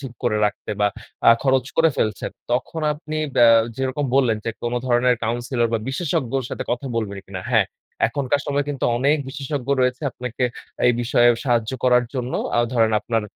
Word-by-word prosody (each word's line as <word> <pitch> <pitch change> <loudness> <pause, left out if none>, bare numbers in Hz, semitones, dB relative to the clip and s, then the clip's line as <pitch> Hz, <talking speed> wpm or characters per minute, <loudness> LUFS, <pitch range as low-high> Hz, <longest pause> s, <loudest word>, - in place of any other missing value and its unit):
ঠিক 135 -4 -7
করে 110 -3 +2
রাখতে 105 - -5
বা 105 - +4 0.4
আ - - +10
খরচ 130 -2 +2
করে 165 0 +5
ফেলছেন। 105 -1 -1 0.2
তখন 130 +6 -1
আপনি 155 0 -6 0.2
ব্য - - +3 0.4
যেরকম 135 +2 -1
বললেন 120 -5 +3
যে 115 - -1
কোনো 120 +1 -1
ধরনের 125 0 +3
counselor 120 +1 0
বা - - +2
বিশেষজ্ঞর 135 -3 -1
সাথে - - -4
কথা 130 +3 -2
বলবেন 100 -3 -2
কিনা? 95 -1 -6
হ্যাঁ। - - +4 0.4
এখনকার 140 +3 0
সময়ে 145 0 0
কিন্তু 145 -2 -3
অনেক 140 +4 +3
বিশেষজ্ঞ 135 -1 -5
রয়েছে 125 +2 +1
আপনাকে 125 +1 -3 0.4
এই 125 - +5
বিষয়ে 120 0 +4 0.2
সাহায্য 120 -4 +1
করার 125 -1 +4
জন্য। 125 -1 -3 0.2
আ - - +3
ধরেন 115 -2 +3
আপনার 115 -1 -1
125 Hz, 175 wpm, -22 LUFS, 120-135 Hz, 0.4 s, আ